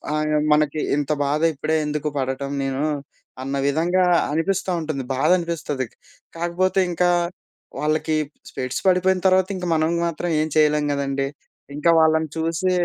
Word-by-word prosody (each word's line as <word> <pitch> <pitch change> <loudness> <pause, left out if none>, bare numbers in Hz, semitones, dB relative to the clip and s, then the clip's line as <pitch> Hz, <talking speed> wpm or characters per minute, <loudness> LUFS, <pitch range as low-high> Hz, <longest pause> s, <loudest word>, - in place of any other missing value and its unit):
అయ 155 0 +1
మనకి 150 0 +1 0.2
ఇంత 145 +1 -1
బాధ 145 +2 0
ఇప్పుడే 155 +3 0
ఎందుకు 150 0 -2
పడటం 135 +1 -3
నేను, 135 +1 -2 0.6
అన్న 135 +1 -3
విధంగా 175 +5 +2 0.3
అనిపిస్త 185 +6 0
ఉంటది 155 -4 -3
బాధ 140 +5 +1
అనిపిస్తది. 155 -6 -3 0.5
కాకపోతే 175 +3 0
ఇంకా 175 +1 +2 0.7
వాళ్ళకి 155 +1 0 0.3
స్పెక్స్ 130 0 -4
పడిపోయిన 185 0 +3
తర్వాత, 185 0 +4
ఇంకా 180 - -4
మనం 155 +1 +1 0.2
మాత్రం 170 +1 -3
ఏం 155 - 0
చేయలేం 150 -1 +3
గదండీ! 140 -1 -1 0.5
ఇంకా 150 +3 +1
వాళ్ళని 160 0 +3
చూసి 165 +3 0
155 Hz, 135 wpm, -22 LUFS, 145-170 Hz, 0.7 s, తర్వాత